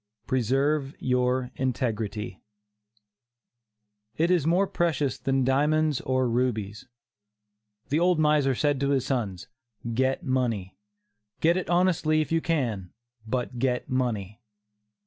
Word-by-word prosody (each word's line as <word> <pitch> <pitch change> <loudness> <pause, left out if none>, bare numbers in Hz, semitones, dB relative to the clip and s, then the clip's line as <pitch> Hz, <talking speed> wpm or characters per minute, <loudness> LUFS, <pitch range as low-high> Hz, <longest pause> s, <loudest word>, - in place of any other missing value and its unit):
PRESERVE 135 +4 0
YOUR 125 0 0
INTEGRITY. 110 -5 -2 1.8
It 170 +3 +2
is 170 -5 +2
more 180 +4 +3
precious 155 -8 -1
than 135 -1 +1
diamonds 150 +2 +2
or 130 -1 +1
rubies. 115 -4 -1 1.0
The 150 - +2
old 175 0 +3
miser 150 -3 +3
said 145 +1 +1
to 140 0 0
his 135 -3 +1
sons: 100 -9 -2 0.5
"Get 130 +3 0
money; 120 -8 -1 0.6
get 170 +2 +3
it 185 -2 -3
honestly, 175 -3 +2
if 155 - -2
you 165 0 +2
can, 120 - -1 0.4
but 125 0 -3
get 125 -1 -1
money." 115 -5 -2
130 Hz, 115 wpm, -26 LUFS, 120-155 Hz, 1.8 s, more